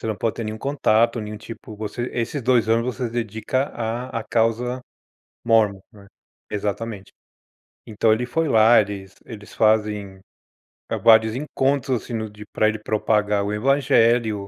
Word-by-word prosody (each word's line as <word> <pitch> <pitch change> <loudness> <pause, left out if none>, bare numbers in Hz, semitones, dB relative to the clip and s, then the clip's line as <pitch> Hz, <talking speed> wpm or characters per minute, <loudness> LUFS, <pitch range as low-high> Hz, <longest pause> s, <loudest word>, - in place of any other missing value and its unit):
Você - - -4
não 110 - -2
pode 115 +1 -1
ter 115 - -5
nenhum 110 0 -5
contato, 115 -3 +1
nenhum 105 0 -6
tipo 110 0 -10
você 110 +3 -4
esses 120 +4 -3
2 120 -2 +2
anos, 115 +1 +2
você 125 0 -3
se 115 - -8
dedica 120 +3 -2
à 120 +1 -4
à 110 - -7
causa 120 +2 0 0.7
Mormon, 110 -4 +3
né. 100 -2 -16 0.4
Exatamente. 105 0 -4 0.8
Então 110 0 +1
ele 120 +3 -1
foi 160 +6 -1
lá, 115 +1 +6
eles 100 -1 -7
eles 105 -3 -11
fazem, 105 -3 +1 0.7
eh, - - -1
vários 110 0 +5
encontros, 135 -2 -1
assim, 120 - -8
no 110 -1 -3
de 105 0 -12
pra 110 - +2
ele 110 0 -4
propagar 105 -1 0
o 100 - -2
evangelho, 115 -4 +2
110 Hz, 160 wpm, -22 LUFS, 105-120 Hz, 0.8 s, lá